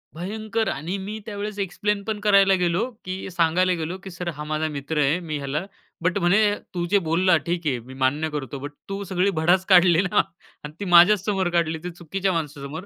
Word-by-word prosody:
भयंकर 220 +5 -3
आणि 165 +8 -3
मी 205 +3 -6
त्यावेळेस 205 -1 -5
एक्सप्लेन 200 +2 -1
पण 215 0 -3
करायला 200 -2 +5
गेलो, 180 +7 +1 0.2
की 185 +1 -5
सांगायला 175 +1 +2
गेलो, 165 +4 -4
की 195 - -7
"सर 175 0 -5
हा 150 - -6
माझा 155 +1 -1
मित्र 150 +1 -3
आहे, 145 +5 +2
मी 160 -4 -4
ह्याला" 145 +5 -3 0.4
बट 180 +4 +1
म्हणे, 175 +3 +3 0.3
"तू 175 -1 -2
जे 205 - +5
बोलला 180 +3 +3
ठीक 170 -1 -2
आहे, 130 -4 0
मी 125 +3 -12
मान्य 135 +4 0
करतो. 145 -2 -5
बट 145 +2 -6 0.2
तू 195 +1 -4
सगळी 185 0 0
भडास 175 +3 +3
काढली 180 -2 +6
ना 195 +1 +2 0.4
आणि 150 0 -8
ती 205 - -4
माझ्याच 180 +2 +6
समोर 195 -4 0
काढली 165 -1 +1
ते 180 - -4
चुकीच्या 185 +3 -2
माणसासमोर." 150 +1 -5
175 Hz, 200 wpm, -24 LUFS, 155-195 Hz, 0.4 s, काढली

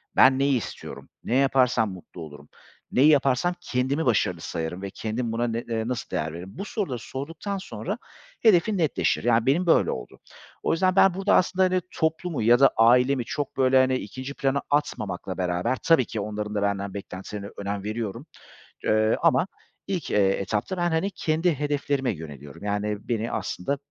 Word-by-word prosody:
"Ben 130 +1 +6
neyi 140 -1 +3
istiyorum, 95 -6 -8
ne 120 - -1
yaparsam 130 -5 +3
mutlu 90 -1 -11
olurum, 75 -2 -11 0.4
neyi 140 +4 +5
yaparsam 140 +3 +3
kendimi 135 +2 -1
başarılı 95 -8 +1
sayarım 80 +3 -4
ve 100 - -4
kendim 115 +4 -3
buna 120 +1 0
ne 115 0 -2
eee, 115 -1 -3
nasıl 125 -2 -3
değer 80 0 -2
veririm?" 90 +3 -8
Bu 200 - -4
soruları 150 - -3
sorduktan 165 - -5
sonra 190 - -5 0.4
hedefin 210 0 +4
netleşir. 160 -5 +1
Yani, 115 -1 +3
benim 155 +7 +2
böyle 170 - +4
oldu. - - -7 0.4
O - - +1
yüzden 185 +2 +2
ben 195 -1 +6
burada 195 +2 +2
aslında, 185 +1 +3
hani, 185 0 +1
toplumu 160 -2 -1
ya 120 +2 +5
da 135 - +6
ailemi 125 +3 +4
çok 145 +2 -4
böyle 130 0 +4
hani 130 0 +3
ikinci 130 +4 -6
plana 140 0 0
atmamakla 105 -10 -2
beraber 90 +7 0
tabii 165 -8 +4
ki 110 - -5
onların 105 0 -4
da 100 - 0
benden 100 -1 -1
beklentilerine 100 +1 -7
önem 100 0 -4
veriyorum, 110 +3 -4 0.6
eee, 110 +1 +3
ama 140 +9 +3 0.4
ilk, 185 -6 -3
eee, 100 -2 +4
etapta 105 - -2
ben, 175 0 +1
hani, 190 +5 0
kendi 160 0 0
hedeflerime 145 -3 0
yöneliyorum. 75 -3 -9
Yani, 105 0 -1
beni 115 -1 -1
aslında 140 +11 -2
125 Hz, 170 wpm, -25 LUFS, 100-145 Hz, 0.6 s, Ben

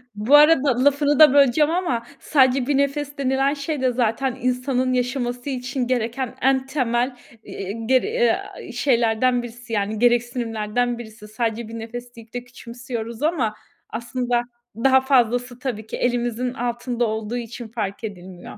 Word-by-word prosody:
Bu 220 +8 +4
arada 290 -4 +5
lafını 285 +1 +3
da 305 -4 +8
böleceğim 285 +2 +4
ama 335 -10 -1
sadece 260 -3 +3
bir 285 -1 +2
nefes 285 +1 -1
denilen 270 +1 +1
şey 285 -1 -4
de 255 - +2
zaten 245 +2 0
insanın 255 0 0
yaşaması 250 +1 -2
için 255 -1 -3
gereken 245 0 -2
en 265 0 +2
temel, 250 -2 0 0.3
eee, 195 0 -6
ger 430 - +2
a, - - -9
şeylerden 240 -1 +2
birisi, 240 0 -9
yani, 210 0 -1
gereksinimlerden 240 -1 0
birisi. 220 -2 -11
Sadece 225 +1 -2
bir 230 +1 -7
nefes 240 +2 -8
deyip 230 -1 -14
de 245 0 -4
küçümsüyoruz 235 -1 -7
ama 295 -9 +1 0.4
aslında 240 +1 -1 0.3
daha 265 +3 +4
fazlası 245 -2 +1
tabii 220 -5 -4
ki - - -5
elimizin 245 0 -1
altında 240 -1 -2
olduğu 220 +2 -3
için 235 0 -7
fark 215 -1 -4
edilmiyor. 185 -4 -8
245 Hz, 145 wpm, -22 LUFS, 230-265 Hz, 0.4 s, da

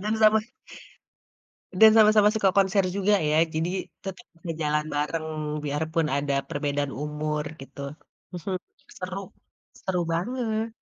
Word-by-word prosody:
Dan 215 +2 0
sama 220 0 +5 1.3
dan 220 +4 +8
sama-sama 215 -1 +6
suka 210 -3 +2
konser 195 0 +3
juga 200 +1 +3
ya 155 +1 +3
jadi, 165 +3 0 0.3
tetap 195 +5 -7 0.2
ngejalan 150 -2 -1
bareng 155 +2 -1 0.4
biarpun 155 +2 0
ada 140 0 0
perbedaan 145 -1 -2
umur 150 +1 -2 0.2
gitu, 135 +1 -11 0.5
mhm, 185 +2 -4 0.4
seru, 185 +1 -6 0.4
seru 185 -2 -2
banget. 225 +3 -1
175 Hz, 115 wpm, -26 LUFS, 150-210 Hz, 1.3 s, dan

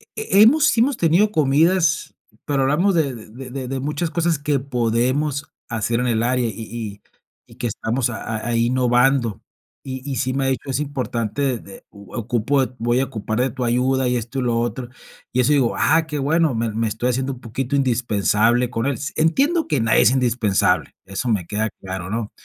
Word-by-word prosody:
He 435 - +1
he - - +9
hemos 295 +7 +5
sí 230 - +3
hemos 270 +2 +2
tenido 180 +6 +3
comidas, 160 +2 +2 0.3
pero 140 -2 0
hablamos 170 +8 +2
de 150 -5 +1
de 120 +3 -10
de 130 -1 -5
de 135 0 -3
muchas 150 +4 -2
cosas 170 -2 0
que 145 -1 0
podemos 130 +3 -1 0.2
hacer 115 +1 -1
en 125 - 0
el 115 -1 +1
área 125 0 +1
y 110 - -4
y 110 -2 -7 0.5
y - - -16
que 120 - -3
estamos 115 +3 -1
a 110 -1 -5
ahí 115 0 +1
innovando. 125 -2 +2 0.4
Y 130 -1 -6
y 135 - -2
sí 130 -1 -1
me 135 0 0
ha - - +1
dicho, 135 +1 -2
es 135 +1 0
importante 130 -2 -2
de 100 -2 -13
u 100 -1 -15
ocupo 120 +4 +1
voy 120 +2 +1
a 135 - +1
ocupar 110 -3 -4
de 130 +1 +2
tu 125 - -5
ayuda, 130 +2 +1
y 125 0 +1
esto 120 +4 -4
y - - 0
lo 120 -1 +1
otro. 120 +1 -3 0.4
Y 125 - -1
eso 125 - +2
digo, 135 -5 +2
ah, 160 0 +3
qué 150 -2 -3
bueno, 155 +1 +2
me 115 0 -1
me 115 0 0
estoy 110 +3 -1
haciendo 130 +2 -1
un 125 - -12
poquito 130 +3 -3
indispensable 120 -2 +2
con 115 0 -2
él. 140 - +1
S 140 +5 -5
entiendo 280 - +2
que 145 -7 +1
nadie 110 -1 +4
es 115 - +5
indispensable, 120 -6 +1
eso 95 +6 -3
me 100 -6 0
queda 110 +3 -1
claro, 95 -1 -5
¿no? 110 0 -3
125 Hz, 205 wpm, -21 LUFS, 115-140 Hz, 0.5 s, he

